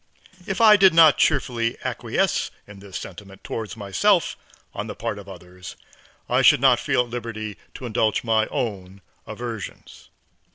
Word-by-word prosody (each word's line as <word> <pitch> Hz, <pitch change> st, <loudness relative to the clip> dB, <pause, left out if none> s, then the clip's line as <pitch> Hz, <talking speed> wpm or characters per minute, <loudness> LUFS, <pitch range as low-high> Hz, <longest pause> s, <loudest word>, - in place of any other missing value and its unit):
If 195 Hz, -, -3 dB
I 215 Hz, -2 st, +7 dB
did 190 Hz, -4 st, +5 dB
not 160 Hz, -3 st, +7 dB
cheerfully 120 Hz, -6 st, +1 dB
acquiesce -, -, -1 dB, 0.2 s
in 100 Hz, -1 st, -13 dB
this 95 Hz, -2 st, -8 dB
sentiment 95 Hz, +1 st, -11 dB
towards 110 Hz, -2 st, -6 dB
myself 100 Hz, -3 st, +1 dB, 0.4 s
on -, -, -5 dB
the -, -, -7 dB
part 105 Hz, -, -4 dB
of 100 Hz, -1 st, -12 dB
others, 90 Hz, -1 st, -11 dB, 0.5 s
I -, -, +2 dB
should -, -, +6 dB
not -, -, +4 dB
feel 125 Hz, -, +1 dB
at 120 Hz, -, -13 dB
liberty 110 Hz, -3 st, -5 dB, 0.2 s
to 130 Hz, -, -8 dB
indulge 110 Hz, -2 st, 0 dB
my 110 Hz, -1 st, +1 dB
own 100 Hz, -4 st, -5 dB, 0.3 s
aversions. 115 Hz, -, -8 dB
110 Hz, 155 wpm, -23 LUFS, 100-120 Hz, 0.5 s, I